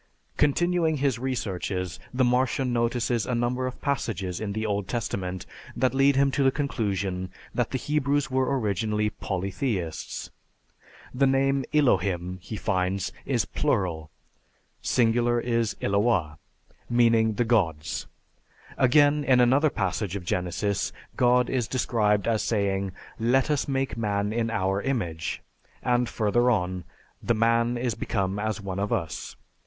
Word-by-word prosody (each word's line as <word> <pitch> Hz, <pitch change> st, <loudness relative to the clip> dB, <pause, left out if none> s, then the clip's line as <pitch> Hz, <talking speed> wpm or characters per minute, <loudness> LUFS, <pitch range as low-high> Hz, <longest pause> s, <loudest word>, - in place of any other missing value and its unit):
Continuing 160 Hz, +2 st, +2 dB
his 135 Hz, -4 st, 0 dB
researches, 95 Hz, -8 st, -3 dB
the 130 Hz, 0 st, +1 dB
Martian 125 Hz, +1 st, +1 dB
notices 120 Hz, -1 st, 0 dB
a 125 Hz, -, 0 dB
number 125 Hz, +2 st, 0 dB
of 130 Hz, -, -7 dB
passages 100 Hz, -10 st, -2 dB
in 105 Hz, -2 st, -3 dB
the 110 Hz, +1 st, -2 dB
Old 100 Hz, -2 st, -1 dB
Testament 95 Hz, -6 st, -3 dB, 0.3 s
that 130 Hz, -2 st, +1 dB
lead 135 Hz, +1 st, +4 dB
him 140 Hz, 0 st, +3 dB
to 140 Hz, -, 0 dB
the 135 Hz, -, +5 dB
conclusion 100 Hz, -10 st, -2 dB, 0.2 s
that 120 Hz, -2 st, 0 dB
the 130 Hz, -, -1 dB
Hebrews 145 Hz, 0 st, 0 dB
were 130 Hz, +1 st, +1 dB
originally 105 Hz, 0 st, 0 dB
polytheists. 95 Hz, -1 st, -3 dB, 0.8 s
The 135 Hz, +2 st, +3 dB
name 135 Hz, 0 st, +2 dB
Elohim, 90 Hz, -, +1 dB
he 110 Hz, -, -7 dB
finds, 95 Hz, -2 st, -1 dB, 0.2 s
is -, -, +1 dB
plural 80 Hz, -5 st, -1 dB, 0.7 s
(singular, 120 Hz, 0 st, +2 dB
Eloah), 110 Hz, -7 st, 0 dB, 0.5 s
meaning 115 Hz, -2 st, +4 dB
the 120 Hz, +3 st, 0 dB
gods. 80 Hz, -10 st, 0 dB, 0.7 s
Again, 145 Hz, +3 st, +5 dB
in 130 Hz, -3 st, +4 dB
another 135 Hz, +5 st, +4 dB
passage 100 Hz, -3 st, -2 dB
of 95 Hz, -3 st, -5 dB
Genesis, 95 Hz, +2 st, -1 dB, 0.2 s
God 125 Hz, 0 st, +4 dB
is 125 Hz, -4 st, -1 dB
described 105 Hz, -5 st, +1 dB
as 115 Hz, -2 st, +2 dB
saying, 100 Hz, -3 st, 0 dB, 0.3 s
"Let 130 Hz, +5 st, +2 dB
us 145 Hz, -, 0 dB
make 135 Hz, -5 st, -1 dB
man 105 Hz, -2 st, -1 dB
in 115 Hz, 0 st, 0 dB
our 95 Hz, -3 st, 0 dB
image 85 Hz, -12 st, -2 dB, 0.4 s
(I, -, -, -2 dB
26)," -, -, +5 dB
and 120 Hz, -1 st, +1 dB
further 120 Hz, +3 st, +2 dB
on, 90 Hz, -5 st, 0 dB, 0.4 s
"The 120 Hz, -, +1 dB
man 115 Hz, +2 st, +2 dB
is 120 Hz, -1 st, -1 dB
become 100 Hz, -2 st, -2 dB
as 110 Hz, 0 st, -2 dB
one 95 Hz, -1 st, -4 dB
of 100 Hz, +1 st, -1 dB
us." 80 Hz, -2 st, -3 dB
115 Hz, 140 wpm, -26 LUFS, 95-130 Hz, 0.8 s, the